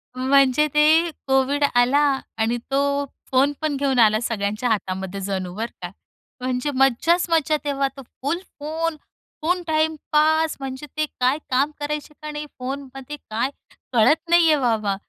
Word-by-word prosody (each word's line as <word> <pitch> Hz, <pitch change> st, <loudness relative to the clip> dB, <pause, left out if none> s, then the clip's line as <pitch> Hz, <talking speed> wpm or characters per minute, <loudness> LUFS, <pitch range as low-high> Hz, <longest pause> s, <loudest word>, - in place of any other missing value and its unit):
म्हणजे 270 Hz, +2 st, +3 dB
ते 310 Hz, +3 st, +5 dB, 0.2 s
कोव्हिड 270 Hz, +2 st, +2 dB
आला 245 Hz, +4 st, +4 dB, 0.4 s
आणि 230 Hz, +2 st, +1 dB
तो 280 Hz, +1 st, +1 dB, 0.3 s
फोन 270 Hz, +2 st, +3 dB
पण 310 Hz, -2 st, 0 dB
घेऊन 270 Hz, -2 st, +1 dB
आला 215 Hz, -1 st, +5 dB
सगळ्यांच्या 215 Hz, +1 st, -1 dB
हातामध्ये 190 Hz, -2 st, -2 dB
जणू 185 Hz, -2 st, -3 dB
बरं 225 Hz, +3 st, -4 dB
का, 175 Hz, -, -5 dB, 0.5 s
म्हणजे 255 Hz, +3 st, -1 dB
मज्जाच 270 Hz, +7 st, +3 dB
मज्जा 315 Hz, -2 st, +2 dB
तेव्हा, 280 Hz, -1 st, 0 dB
तो -, -, -7 dB
फुल 285 Hz, +6 st, -4 dB, 0.2 s
फोन 320 Hz, +2 st, -2 dB, 0.5 s
फुल 355 Hz, +3 st, +1 dB
टाईम 315 Hz, 0 st, +1 dB, 0.2 s
पास, 315 Hz, +1 st, +3 dB
म्हणजे 270 Hz, +1 st, -6 dB
ते 310 Hz, -, +2 dB
काय 255 Hz, +3 st, +3 dB
काम 270 Hz, +4 st, +2 dB
करायचे 300 Hz, 0 st, -4 dB
का 305 Hz, 0 st, -6 dB
नाही 295 Hz, 0 st, -5 dB
फोनमध्ये 270 Hz, +1 st, -6 dB
काय 230 Hz, +4 st, 0 dB, 0.4 s
कळत 305 Hz, +8 st, +3 dB
नाहीये 335 Hz, -2 st, +5 dB
बाबा, 220 Hz, -6 st, +1 dB
275 Hz, 145 wpm, -22 LUFS, 245-300 Hz, 0.5 s, ते